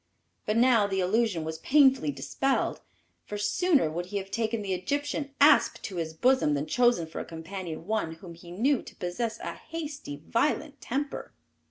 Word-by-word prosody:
But 215 +1 +1
now 230 -4 +5
the 195 -1 -1
illusion 190 -2 +1
was 160 0 -5
painfully 265 - +4
dispelled, 265 - -1 0.4
for 210 - -6
sooner 270 - +2
would 175 +2 -4
he 200 - -3
have 195 0 -5
taken 225 0 -1
the 195 -1 -1
Egyptian 285 +8 -2
asp 290 +1 +5
to 190 - -5
his 160 -1 -3
bosom 250 - +3
than 140 +1 -1
chosen 240 -4 +3
for 160 - -7
a - - -3
companion 165 0 -7
one 210 -6 -1
whom 170 +1 -11
he 170 +1 -13
knew 240 +10 +1
to - - -13
possess 220 +6 -3
a - - -4
hasty, 295 - -7
violent 290 +2 0
temper. 280 +4 -3
210 Hz, 175 wpm, -28 LUFS, 170-265 Hz, 0.4 s, now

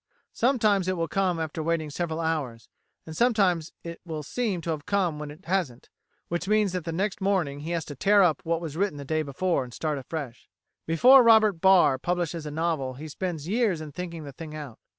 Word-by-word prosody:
Sometimes 215 -7 +2
it 185 -1 0
will 165 0 -1
come 185 -3 0
after 160 0 -3
waiting 160 -1 -1
several 165 +1 -3
hours, 150 -9 -3 0.4
and 160 - -8
sometimes 190 -7 +2
it 170 0 -8
will 160 -3 -5
seem 215 - -2
to 165 - -3
have 150 -2 -5
come 180 -7 0
when 150 -1 -6
it 155 +6 -13
hasn't, 170 -10 -2 0.4
which 175 +2 -3
means 210 -2 +2
that 170 -2 -3
next 195 +4 -2
morning 180 -8 0
he 155 +3 -6
has 170 -2 -2
to 145 - -7
tear 200 +8 +4
up 165 -4 +2
what 165 0 -1
was 160 -3 -6
written 195 -3 -1
the 140 - -7
day 155 +2 0
before 155 +1 -1
and 125 -2 -11
start 150 -3 -2
afresh.[133:A] 135 -3 -9
Before 250 +12 +7
Robert 220 -2 +6
Barr 180 -8 +5
publishes 170 -1 -2
a - - -3
novel 150 -4 -2
he 150 +4 -8
spends 160 -1 -4
years 210 -4 +1
in 155 -1 -8
thinking 170 0 -6
the 140 - -8
thing 155 +2 -9
out. 145 -6 -8
165 Hz, 210 wpm, -26 LUFS, 150-190 Hz, 0.4 s, Before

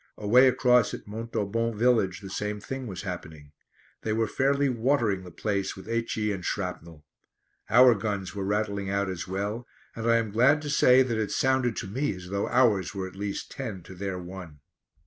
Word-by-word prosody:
Away 125 +6 +5
across 125 -2 +3
at - - -11
Montaubon 115 +1 -2
village 110 -4 +2
the 95 - -8
same 105 +1 -3
thing 130 +4 -6
was 95 -2 -6
happening. 80 -6 -7 0.5
They 110 - -1
were 115 +1 +1
fairly 140 +5 +1
watering 115 -6 +1
the 90 - -10
place 100 +2 -2
with 95 - -11
H.E. 115 -2 -1
and 95 -3 -4
shrapnel. 85 -6 -5 0.6
Our 125 +1 +7
guns 100 -3 -3
were 100 -1 -4
rattling 100 -1 -1
out 100 -1 0
as 90 0 -5
well, 100 +6 -3 0.3
and 115 0 -2
I 115 - +5
am 110 -2 -1
glad 125 +8 +4
to 145 - -3
say 130 -2 +6
that 115 -4 -2
it 110 - -1
sounded 130 -3 +1
to - - -4
me 120 +2 -1
as 90 0 -10
though 100 +1 -2
ours 110 -7 +2
were 95 -1 -3
at 95 - -12
least 100 0 -5
ten 110 -10 -6
to 90 - -11
their 95 0 -4
one. 90 -5 -9
105 Hz, 190 wpm, -27 LUFS, 95-120 Hz, 0.6 s, Our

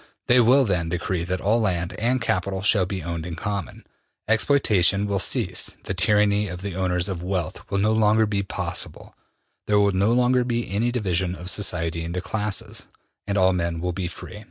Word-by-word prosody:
They 125 +1 +6
will 130 +3 +5
then 90 -5 0
decree 90 0 -2
that 90 +1 -2
all 110 +4 +2
land 90 -4 0
and 125 +4 +1
capital 95 -3 -1
shall 100 -3 +3
be 95 -3 -4
owned 85 -1 -4
in 85 -1 -6
common; 100 +3 -5 0.4
exploitation 105 -5 +3
will 100 -1 -1
cease; - - -1
the - - -3
tyranny 105 +2 +2
of 90 0 -7
the 100 -2 -4
owners 90 -1 -1
of 95 -4 -4
wealth 90 0 -3
will 100 - -1
no 105 +2 +2
longer 110 0 +3
be 105 -1 -1
possible; 95 - -5 0.5
there 105 -1 +3
will 100 0 +3
no 100 +4 +2
longer 125 +1 +3
be 120 -1 -2
any 115 +5 0
division 95 -6 -1
of 90 +1 -2
society 85 -4 -1
into 85 +2 -3
classes, 105 +2 -3 0.4
and 100 0 -1
all 95 0 +4
men 85 -2 -2
will 90 +1 -2
be 90 0 -3
free. 90 - -9
100 Hz, 190 wpm, -23 LUFS, 90-105 Hz, 0.5 s, They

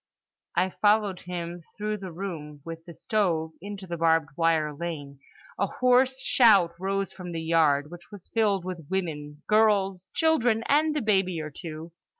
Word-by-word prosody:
I 185 +1 +2
followed 205 -2 +2
him, 175 -1 -6 0.2
through 210 0 -2
the 190 -3 -7
room 160 -5 -6
with 165 0 -8
the 170 - -10
stove, 170 -7 0
into 200 0 -7
the 170 -1 -5
barbed 165 -2 +2
wire 160 -2 +2
lane. 145 -4 -6 0.4
A 200 - +2
hoarse 255 +3 +3
shout 205 -10 +5
rose 195 +1 -2
from 180 -2 -8
the 165 -1 -4
yard—which 160 0 +1
was 205 -4 -11
filled 205 -5 +1
with 175 -5 -6
women, 150 -6 -4
girls, 200 -4 +2
children, 245 -9 +2
and 305 +1 +3
a 290 - -1
baby 190 -5 +1
or 155 -1 -5
two. 160 +1 -8
180 Hz, 155 wpm, -27 LUFS, 165-205 Hz, 0.4 s, shout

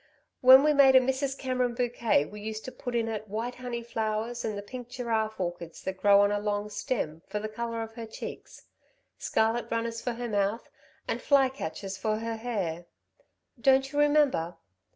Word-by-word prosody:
When 260 +1 +9
we 300 0 +4
made 275 -2 +6
a - - +10
Mrs. 265 +1 -1
Cameron 255 -2 -1
bouquet, 235 - +1
we 210 +6 -10
used 215 +1 -5
to 255 - -5
put 245 -2 -6
in 230 -1 +1
it 215 -1 -4
white 225 +4 -3
honey 245 -2 -5
flowers 225 +1 -2
and 215 -2 -2
the 200 - -5
pink 245 +3 -8
giraffe 225 -4 -2
orchids 175 -2 -5
that 190 0 -4
grow 200 +1 +6
on 205 0 +3
a 205 - 0
long 205 0 -2
stem, 185 -7 -3
for 210 - -4
the 210 +1 -3
colour 230 +1 -4
of 225 0 -9
her 230 -1 -7
cheeks, 220 - -9 0.6
scarlet 225 +2 0
runners 230 0 -2
for 245 - -2
her 240 +1 -4
mouth, 205 +1 -1 0.4
and - - -2
fly 275 -2 +4
catchers 195 - -6
for 215 +2 -1
her 225 0 -4
hair. 190 -8 -3 0.7
Don't 270 +1 +4
you 290 - -1
remember? 290 - +3
230 Hz, 190 wpm, -28 LUFS, 205-250 Hz, 0.7 s, a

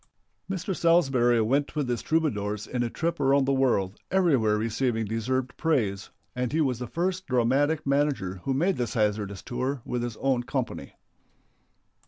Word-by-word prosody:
Mr. 190 0 -2
Salsbury 135 -9 +3
went 140 +8 0
with 145 -3 -1
his 120 -1 -1
Troubadours 105 -10 -1
in 125 - -3
a 120 - 0
trip 170 +6 -2
around 135 0 +3
the 135 - +1
world, 115 -8 +1
everywhere 135 - +3
receiving 115 +1 0
deserved 125 +4 -2
praise, 110 -12 0 0.3
and 125 -1 -1
he 160 - 0
was 130 -6 +1
the 125 - -4
first 185 +6 -2
dramatic 135 +5 +2
manager 135 -10 0
who 135 - 0
made 175 +7 +1
this 120 0 -2
hazardous 105 -3 -1
tour 130 +1 -3
with 125 - -2
his 120 -2 -4
own 135 -3 +1
company. 125 - -4
130 Hz, 160 wpm, -27 LUFS, 115-145 Hz, 0.3 s, Salsbury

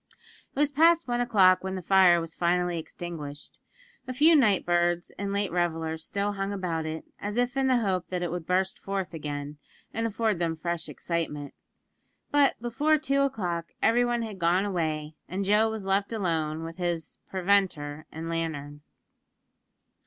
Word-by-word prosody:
It - - -14
was 290 0 +2
past 330 +2 +4
one 240 0 0
o'clock 185 -6 +4
when 190 0 -3
the 185 - -5
fire 185 -1 +6
was 165 -1 -6
finally 175 0 +1
extinguished. 155 -3 -8 0.5
A 255 - -3
few 310 +6 +6
night 215 -10 +4
birds 175 0 +1
and 200 0 -2
late 200 -2 0
revellers 165 -2 -1
still 200 +3 -1
hung 195 0 -3
about 170 -5 -2
it, 160 0 -5
as 205 +2 -4
if 245 +2 +1
in 270 -1 +2
the 255 -1 +4
hope 190 -6 0
that 180 -1 -3
it 175 - -2
would 175 -2 -5
burst 185 +1 0
forth 195 -4 -3
again, 145 -1 -5 0.3
and 230 0 0
afford 220 -3 0
them 165 -2 0
fresh 170 0 -3
excitement; 155 -4 -3 0.8
but 290 -1 +3
before 285 +7 +2
two 275 -2 +1
o'clock, 180 - -1
everyone 240 0 +2
had 210 -4 -7
gone 175 +3 +2
away, 155 -5 -2 0.2
and 195 +2 -2
Joe 210 +3 +4
was 220 -3 -5
left 195 +2 +1
alone 165 -7 -1
with 165 +1 -7
his 175 -3 -3
"preventer" 175 -6 0
and 160 +1 -6
lantern. 155 -3 -4
185 Hz, 165 wpm, -27 LUFS, 165-215 Hz, 0.8 s, fire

